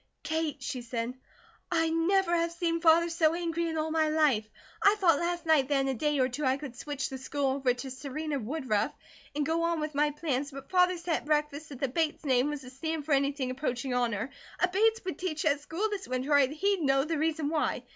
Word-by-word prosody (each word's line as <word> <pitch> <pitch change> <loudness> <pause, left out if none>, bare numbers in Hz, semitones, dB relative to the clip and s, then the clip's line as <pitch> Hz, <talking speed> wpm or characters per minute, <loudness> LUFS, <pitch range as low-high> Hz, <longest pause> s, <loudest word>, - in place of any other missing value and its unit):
"Kate," 315 -3 -2
she 255 -2 -3
said, 235 0 -3 0.6
"I 325 -1 +2
never 345 +2 +2
have 335 0 +1
seen 335 -1 -1
Father 335 0 +5
so 330 -1 +2
angry 340 -1 -1
in 320 -1 -3
all 315 0 -1
my 315 -1 +2
life. 285 -9 +2 0.3
I 405 +1 +6
thought 345 -8 +3
last 345 0 -2
night 310 -5 +4
that 285 -1 +2
in 270 - -1
a - - +1
day 295 +4 0
or 255 -1 +3
two 265 +4 -5
I 260 0 +2
could 275 -4 -8
switch 285 +1 -4
the 265 -1 -6
school 275 0 -1
over 265 -1 +1
to 265 +1 -6
Serena 280 +3 -4
Woodruff, 250 -3 -1 0.4
and 295 0 0
go 325 +2 0
on 335 -1 +1
with 305 0 -3
my 295 +1 +2
plans, 290 -2 -2
but 275 -1 -10
Father 360 -1 +4
said 335 -1 -1
at - - -9
breakfast 300 0 0
if 265 - -8
the 275 - +1
Bates 310 +4 -1
name 260 0 +3
was 295 -1 -4
to 255 - -11
stand 315 +3 -4
for 310 - -5
anything 275 -1 +1
approaching 255 -1 -2
honour, 240 0 0 0.3
a 360 - +4
Bates 440 +3 +2
would 365 -5 -4
teach 315 -4 -2
that 290 -2 +2
school 335 +8 -2
this 400 -2 -4
winter 255 +3 -2
or 285 - +7
he'd 335 +8 +1
know 270 -2 +3
the 315 0 -2
reason 315 -1 0
why. 310 -1 0
300 Hz, 230 wpm, -29 LUFS, 270-330 Hz, 0.6 s, or